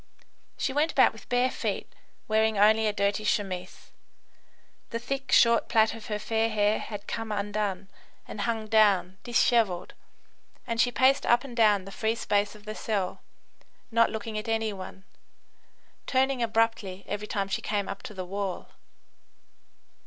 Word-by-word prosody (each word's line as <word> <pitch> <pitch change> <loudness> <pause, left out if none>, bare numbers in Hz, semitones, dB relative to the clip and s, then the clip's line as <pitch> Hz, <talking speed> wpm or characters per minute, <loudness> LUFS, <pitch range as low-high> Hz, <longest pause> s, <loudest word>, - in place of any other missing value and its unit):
She 265 - -1
went 300 +3 +1
about 260 - +4
with 220 - -15
bare 245 +1 +2
feet, - - -4 0.3
wearing 220 0 +2
only 215 +2 +5
a - - +2
dirty 200 +1 0
chemise. 190 -3 -3 1.0
The 230 - -3
thick, 270 +3 -4
short 235 -1 +5
plait 220 -2 +3
of 225 -1 -10
her 210 - -2
fair 225 +1 0
hair 210 0 +1
had 205 -2 -7
come 225 0 -4
undone 205 -2 -2 0.4
and 210 - -6
hung 225 -1 -1
down 200 -4 +3
dishevelled, 230 -6 +1 0.7
and 230 -2 0
she 245 - +2
paced 260 +4 +3
up 240 +1 +4
and 260 -4 -9
down 210 -5 +4
the 195 - -9
free 220 +2 -1
space 205 -2 0
of 210 0 -16
the 215 - -5
cell, 205 -4 -3 0.7
not 230 0 +4
looking 220 0 -4
at 215 - -8
any 225 -1 0
one, 190 0 -9 1.0
turning 265 -1 +1
abruptly 225 -4 0
every 210 +1 -4
time 200 -2 -2
she 195 - -2
came 205 -2 -2
up 195 - -6
to 210 - -9
the 185 -1 -5
wall. 195 0 -4
215 Hz, 160 wpm, -27 LUFS, 200-230 Hz, 1.0 s, only